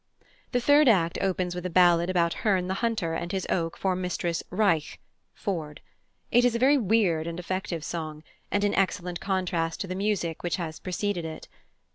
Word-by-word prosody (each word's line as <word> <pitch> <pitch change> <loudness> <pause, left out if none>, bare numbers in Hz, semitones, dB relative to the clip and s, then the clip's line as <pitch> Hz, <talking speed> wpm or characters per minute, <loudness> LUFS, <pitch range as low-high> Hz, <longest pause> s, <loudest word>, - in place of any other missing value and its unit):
The 245 - +2
third 285 +2 +5
act 170 -6 +2
opens 185 -2 0
with 180 0 -5
a 180 - -2
ballad 175 0 +4
about 170 -2 +2
Herne 190 -4 +2
the 190 - -1
Hunter 220 -8 0
and 170 +1 -3
his 190 -1 -2
oak 165 -2 -1
for 190 -1 0
Mistress 180 -2 -2
"Reich" 180 -6 +1 0.4
(Ford). 160 -7 -4 0.5
It 245 - +5
is 245 -1 +3
a - - +2
very 275 +4 +4
weird 190 -7 +2
and 170 +1 -4
effective 180 -2 -3
song, 155 -2 -5 0.3
and 205 - 0
in 205 - +2
excellent 180 -2 0
contrast 180 -4 -1
to 195 - -3
the 185 - -3
music 190 -4 -1
which 175 - -1
has 160 -3 -5
preceded 185 -1 -2
it. 160 -1 -7
180 Hz, 185 wpm, -27 LUFS, 170-200 Hz, 0.5 s, third